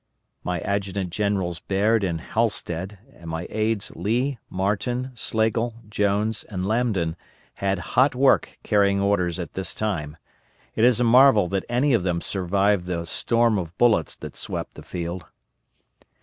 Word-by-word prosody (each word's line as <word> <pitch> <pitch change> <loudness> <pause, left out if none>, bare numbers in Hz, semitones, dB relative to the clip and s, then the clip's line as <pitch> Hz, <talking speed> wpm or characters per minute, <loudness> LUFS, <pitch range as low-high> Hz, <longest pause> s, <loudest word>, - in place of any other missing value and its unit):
My 90 0 -2
Adjutant 100 -2 -2
Generals 95 -4 -1
Baird 105 +3 +1
and 85 -4 -1
Halstead, 100 -3 -2 0.2
and 85 -1 -11
my 80 +2 -3
aides 110 -1 -1
Lee, 120 +8 -1
Marten, 120 +7 -1
Slagle, 115 0 0
Jones, 105 +1 0
and 95 -3 -4
Lambdin 105 -7 0 0.4
had 100 0 -1 0.2
hot 130 0 +4
work 135 +1 +3
carrying 100 -2 +3
orders 100 -4 +1
at 90 -2 -6
this 95 - -4
time. 80 -8 -3 0.6
It 110 - +3
is 125 -1 +4
a - - +3
marvel 120 -4 +6
that 95 0 -1
any 125 +4 +2
of 115 - +3
them 90 -1 0
survived 95 +1 +1
the 85 -2 -2
storm 115 +4 +1
of 85 0 -7
bullets 110 -10 +3
that - - -9
swept - - -4
the - - -11
field. 85 0 -5
100 Hz, 150 wpm, -24 LUFS, 90-115 Hz, 0.6 s, marvel